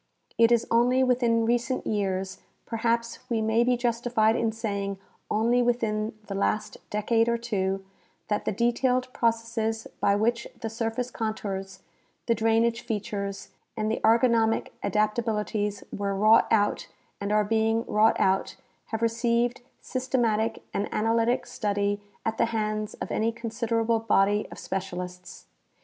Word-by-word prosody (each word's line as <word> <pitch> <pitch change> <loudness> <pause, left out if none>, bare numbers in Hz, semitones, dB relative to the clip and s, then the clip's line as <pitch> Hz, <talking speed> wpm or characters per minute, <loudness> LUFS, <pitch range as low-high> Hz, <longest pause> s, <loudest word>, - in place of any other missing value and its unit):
It 230 0 +6
is 235 -1 +3
only 250 +3 +4
within 240 -3 +2
recent 240 +3 0
years, 190 -2 -2 0.3
perhaps 230 0 -1
we 230 -2 +1
may 220 +2 +2
be 245 0 +2
justified 235 -2 +1
in 225 - +1
sa}^ 220 -2 -3
ing 200 0 -3 0.3
only 235 +3 +2
within 220 -3 0
the 200 - -6
last 200 +2 -1
decade 225 +2 +1
or 235 - +2
two, 195 -4 -2 0.4
that 210 - -1
the - - +1
detailed 250 +3 +1
pro 230 - +3
cesses 225 -1 -3
by 200 - +3
which 235 +3 0
the 225 - -4
surface 230 +2 -2
contours, 195 -4 -4 0.4
the 230 - +3
drainage 225 +1 +2
features, 205 -3 -4 0.3
and 215 0 0
the 225 - -2
agronomic 225 -1 +3
adaptabilities 210 -1 0
were 200 -1 -2
wrought 215 +3 +5
out 205 -2 +2 0.3
and 200 0 -3
are 210 0 +4
being 225 +1 +1
wrought 215 +1 +3
out, 190 0 +1 0.3
have 225 0 -4
received 235 +1 +1 0.2
systematic 230 -4 0
and 200 - -1
anal3^tic 230 +3 +1
study 205 -4 -1 0.2
at 225 0 -2
the - - +5
hands 215 -2 -2
of - - -6
any 225 +1 +1
considerable 230 0 -1
body 205 -1 +2
of - - -10
specialists. 180 -1 -6
225 Hz, 140 wpm, -27 LUFS, 210-235 Hz, 0.4 s, It